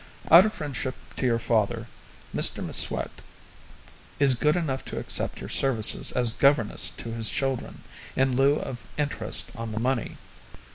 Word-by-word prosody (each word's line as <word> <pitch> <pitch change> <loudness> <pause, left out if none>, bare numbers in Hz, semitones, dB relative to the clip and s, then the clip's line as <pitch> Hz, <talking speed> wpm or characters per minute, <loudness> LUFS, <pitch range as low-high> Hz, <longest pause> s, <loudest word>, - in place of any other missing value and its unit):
Out 175 +6 +8
of 215 - -5
friendship 135 -3 -5 0.2
to 130 - -1
your 115 -1 +1
father, 115 -3 -1 0.5
Mr - - +2
M'Swat - - 0 1.0
is 140 -2 +6
good 150 +5 0
enough 145 -7 -3
to - - -8
accept - - -1
your - - -9
services 115 -6 +2
as 120 -3 +1
governess 140 -6 +2
to 115 - -6
his 115 -1 +3
children, 135 -2 -4 0.3
in 130 -1 0
lieu 135 +2 +3
of 130 -4 -6 0.2
interest 145 -7 +1
on 115 -1 -7
the 110 - -4
money. 125 0 -3
130 Hz, 150 wpm, -25 LUFS, 115-140 Hz, 1.0 s, Out